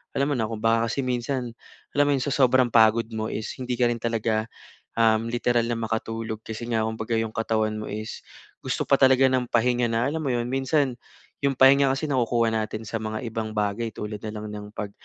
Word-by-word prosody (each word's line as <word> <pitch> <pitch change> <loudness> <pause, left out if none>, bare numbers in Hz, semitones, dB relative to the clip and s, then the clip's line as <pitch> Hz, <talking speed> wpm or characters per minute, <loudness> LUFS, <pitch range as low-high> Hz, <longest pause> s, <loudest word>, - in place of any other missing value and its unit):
alam 140 +2 +1
mo - - +1
na, 110 - 0
kung 110 0 -6
baka 115 0 +3
kasi 135 +4 -2
minsan 125 0 -2 0.4
alam 145 0 +3
mo - - +3
'yon 130 - -1
sa 140 - -2
sobrang 130 -3 +3
pagod 115 0 +5
mo 110 -1 -3
is 110 - -4
hindi 125 -1 -2
ka 120 0 +2
rin 120 - -3
talaga 115 -1 -1 0.5
um 110 0 +4
literal 120 -1 +1
na 115 0 -2
makatulog. 110 0 -3
Kasi 115 +2 -6
nga 115 -2 0
kumbaga 110 +1 -2
'yong 110 -1 -1
katawan 110 -1 0
mo 105 - -6
is 110 +2 -5 0.4
gusto - - -2
pa 140 - +2
talaga 130 0 +5
ng 125 -1 +1
pahinga 120 +1 +2
na 115 +1 0
alam 160 - -2
mo 155 - -3
'yon? 120 0 -1
Minsan 135 -1 0 0.4
'yong 140 -1 0
pahinga 135 +2 +6
kasi 150 +1 -3
nakukuha 120 -3 +2
natin 110 0 -2
sa 110 +1 -4
mga 110 +3 -4
ibang 110 -1 -4
bagay 105 +2 -1
tulad 105 0 -5
na 110 +1 -6
lang 105 0 -6
ng 105 0 -7
pag 105 -2 -4
115 Hz, 215 wpm, -25 LUFS, 110-125 Hz, 0.5 s, pahinga